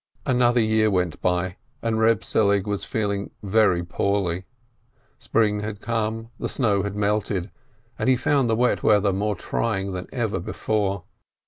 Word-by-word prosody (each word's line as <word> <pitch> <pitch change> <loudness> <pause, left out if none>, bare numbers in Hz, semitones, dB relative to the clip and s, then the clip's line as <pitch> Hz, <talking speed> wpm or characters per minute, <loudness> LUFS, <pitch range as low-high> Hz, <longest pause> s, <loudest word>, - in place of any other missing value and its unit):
Another 125 -1 +3
year 110 0 +3
went 90 -5 -1
by, 90 0 0 0.3
and 115 -1 0
Eeb 110 -1 +3
Selig 100 -2 +2
was 105 -1 -2
feeling 100 -4 -2
very 100 -4 +3
poorly. 95 0 -1 0.7
Spring 105 -2 +1
had 105 -1 -5
come, 115 0 -2
the - - -2
snow 105 -7 +1
had 100 0 -4
melted, 105 -2 -1 0.5
and - - +1
he 130 - +5
found 135 0 +1
the 110 - +3
wet 125 +2 +2
weather 105 -2 +3
more 105 +2 0
trying 100 0 -2
than 90 0 -5
ever 110 -7 -1
before. 100 +1 -1
105 Hz, 150 wpm, -24 LUFS, 95-110 Hz, 0.7 s, he